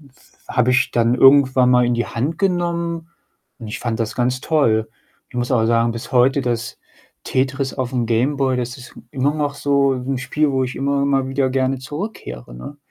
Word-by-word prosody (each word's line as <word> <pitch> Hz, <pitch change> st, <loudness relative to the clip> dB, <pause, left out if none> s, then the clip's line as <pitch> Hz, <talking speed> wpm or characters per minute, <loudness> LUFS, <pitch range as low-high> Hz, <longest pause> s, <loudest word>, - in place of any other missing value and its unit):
Und 140 Hz, -4 st, -20 dB, 0.4 s
habe 125 Hz, 0 st, +2 dB
ich 125 Hz, 0 st, +2 dB
dann 120 Hz, +1 st, +2 dB
irgendwann 130 Hz, -1 st, +5 dB
mal 125 Hz, -1 st, +4 dB
in 120 Hz, 0 st, +1 dB
die 120 Hz, -, -1 dB
Hand 140 Hz, +8 st, -3 dB
genommen 170 Hz, -3 st, -1 dB, 0.5 s
und 115 Hz, -3 st, -8 dB
ich 105 Hz, -, -5 dB
fand 115 Hz, -2 st, -3 dB
das 110 Hz, -1 st, -2 dB
ganz 125 Hz, +1 st, 0 dB
toll. 115 Hz, -10 st, +1 dB, 0.4 s
Ich -, -, -23 dB
muss 120 Hz, 0 st, -2 dB
aber 115 Hz, -3 st, +2 dB
sagen, 115 Hz, 0 st, +2 dB
bis 115 Hz, +3 st, -8 dB
heute 130 Hz, +3 st, +4 dB
das 120 Hz, -1 st, -3 dB, 0.5 s
Tetris 135 Hz, +1 st, -1 dB
auf 130 Hz, -1 st, -3 dB
'm 120 Hz, -2 st, 0 dB
Game 120 Hz, +5 st, +1 dB
Boy, 130 Hz, -2 st, +1 dB
das 125 Hz, +2 st, -3 dB
ist 125 Hz, -, -13 dB, 0.2 s
immer 140 Hz, +2 st, 0 dB
noch 145 Hz, -2 st, -2 dB
so 140 Hz, -1 st, +2 dB
'n 130 Hz, +1 st, -3 dB
Spiel, 150 Hz, +3 st, 0 dB
wo 130 Hz, -1 st, 0 dB
ich 125 Hz, -, -5 dB
immer 140 Hz, +1 st, 0 dB
mal 135 Hz, -1 st, +1 dB
wieder 135 Hz, -1 st, 0 dB
gerne 130 Hz, 0 st, 0 dB
zurückkehre, 145 Hz, -, -7 dB
ne? 140 Hz, -, -9 dB
130 Hz, 200 wpm, -20 LUFS, 120-140 Hz, 0.5 s, irgendwann